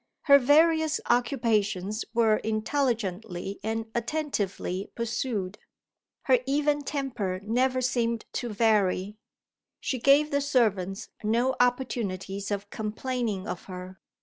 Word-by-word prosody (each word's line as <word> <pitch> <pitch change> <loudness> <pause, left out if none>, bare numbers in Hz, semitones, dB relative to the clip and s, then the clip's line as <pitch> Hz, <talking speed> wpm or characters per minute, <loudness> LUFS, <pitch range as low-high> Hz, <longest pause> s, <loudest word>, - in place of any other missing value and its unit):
Her 280 -1 +7
various 315 +3 +4
occupations 220 -4 0
were 225 -2 +3
intelligently 215 -5 -2
and 225 +1 -2
attentively 225 - -2
pursued; 230 -4 -2 0.6
her 255 -2 +4
even 290 +1 +1
temper 250 -10 -3
never 255 +4 +1
seemed 235 -2 0
to 245 - -3
vary; 210 -2 +1 0.6
she 260 - -2
gave 285 +5 +4
the 285 0 +1
servants 220 -7 0
no 240 +5 +1
opportunities 205 -6 -1
of 200 0 -4
complaining 220 -2 -3
of 175 - -5
her. 185 0 -8
230 Hz, 105 wpm, -27 LUFS, 200-260 Hz, 0.6 s, Her